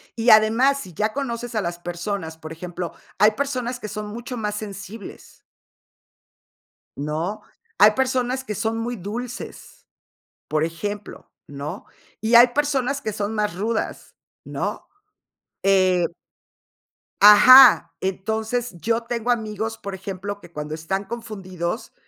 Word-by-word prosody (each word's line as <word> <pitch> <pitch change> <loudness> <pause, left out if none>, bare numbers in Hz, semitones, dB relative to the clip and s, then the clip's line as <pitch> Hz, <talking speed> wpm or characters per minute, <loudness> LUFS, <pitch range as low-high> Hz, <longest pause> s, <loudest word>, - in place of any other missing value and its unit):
Y 230 +1 +1
además, 230 +6 +5
si 185 -8 -9
ya 215 +6 0
conoces 240 -3 -4
a 215 - +1
las 170 -1 -4
personas, 175 -1 -5
por 155 0 -10
ejemplo, 175 +1 -6 0.2
hay 210 +2 +6
personas 250 0 -3
que 215 - -6
son 210 +1 -6
mucho 235 +4 -7
más 210 -1 -2
sensibles. 205 0 -9 1.6
¿No? 155 +8 -3 0.4
Hay 210 +2 +8
personas 260 +1 0
que 215 -5 -5
son 220 +1 -1
muy 235 +2 -3
dulces, 240 - -8 0.6
por 155 0 0
ejemplo, 205 +5 -5 0.2
¿no? 145 +1 -7 0.4
Y 220 +2 +2
hay 240 +1 +9
personas 280 0 0
que 215 - -3
son 205 +1 -3
más 210 -4 -1
rudas, 220 +4 -3 0.3
¿no? - - -4 0.8
Eh 185 -2 +3 1.2
Ajá. 250 +6 +9
Entonces, 220 +4 -2
yo 230 +5 0
tengo 235 0 -2
amigos, 220 -1 -2
por 200 -2 -6
ejemplo, 195 +1 -6
que 175 - -15
cuando 150 -1 -5
están 190 +5 -3
confundidos, 195 -4 -5
215 Hz, 130 wpm, -23 LUFS, 185-235 Hz, 1.6 s, hay